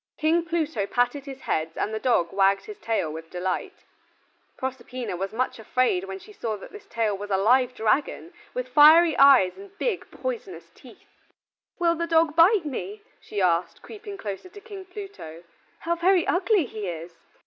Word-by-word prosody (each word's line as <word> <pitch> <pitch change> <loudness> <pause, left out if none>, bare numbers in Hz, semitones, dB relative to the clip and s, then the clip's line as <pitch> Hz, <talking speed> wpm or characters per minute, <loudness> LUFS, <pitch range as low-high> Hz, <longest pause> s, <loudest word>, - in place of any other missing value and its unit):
King 330 +2 +2
Pluto 315 -11 -1
patted 245 +5 0
his 270 -1 -8
heads 160 +1 -2
and 215 - -2
the 220 - -2
dog 215 -8 +1
wagged 195 0 +2
his 425 -2 -10
tail 215 -9 -1
with 165 +1 -9
delight. 185 - -4 0.7
Proserpina 255 -4 -5
was 195 +2 -4
much 245 +1 -2
afraid 220 -4 0
when 190 0 -6
she 425 - -15
saw 225 - -3
that 195 - -12
his 415 -1 -12
tail 225 -3 -1
was 205 +1 -7
a 195 - +2
live 250 +5 +3
dragon, 270 - -1 0.2
with 250 0 -3
fiery 310 +4 +7
eyes 275 - +6
and 400 0 -13
big 450 -7 -2
poisonous 470 -6 -6
teeth. - - -19 0.6
"Will 340 -1 +2
the 335 0 -3
dog 325 -2 +3
bite 350 +2 +5
me?" 395 +9 -5 0.2
she 205 -2 -3
asked, 170 -1 0
creeping 415 -2 -9
closer 205 - -6
to 410 - -12
King 405 -3 -10
Pluto. 365 - -10 0.4
"How 340 - 0
very 355 +1 +3
ugly 370 -1 +2
he 215 -4 -6
is." 170 0 -6
260 Hz, 175 wpm, -25 LUFS, -, 0.7 s, fiery